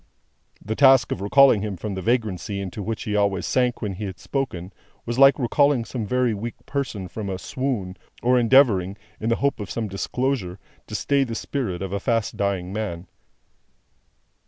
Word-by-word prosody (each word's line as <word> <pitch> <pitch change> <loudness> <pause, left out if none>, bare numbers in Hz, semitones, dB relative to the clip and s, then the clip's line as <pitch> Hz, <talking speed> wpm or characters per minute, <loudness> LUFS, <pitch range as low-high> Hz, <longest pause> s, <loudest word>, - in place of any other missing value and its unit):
The 110 +2 -2
task 135 -1 +5
of - - -3
recalling 120 +1 +5
him 105 -3 -4
from 105 +3 -4
the 95 - -4
vagrancy 105 -3 -1
into 100 +2 -5
which 110 +2 -4
he 105 - -2
always 100 -2 +1
sank 125 -2 0
when 100 -2 -2
he 105 +3 -5
had 95 -2 -6
spoken, 100 -10 -4 0.3
was 120 +2 -3
like 135 -1 +7
recalling 135 0 +2
some 115 -4 -4
very 125 0 +1
weak 115 +3 -5
person 120 -9 -3
from 100 +2 -6
a 95 - -3
swoon, 110 -5 -3 0.3
or 125 +1 +4
endeavouring, 115 -6 +4 0.2
in 110 - -2
the 115 - +3
hope 140 0 0
of 105 - -6
some 115 -2 -3
disclosure, 100 -1 -2 0.3
to - - -6
stay 140 -1 +2
the 115 -3 -4
spirit 105 -9 -3
of 95 0 -5
a 100 - -1
fast 115 -1 -1
dying 95 -2 -2
man. 100 -5 -4
110 Hz, 180 wpm, -23 LUFS, 100-125 Hz, 0.3 s, like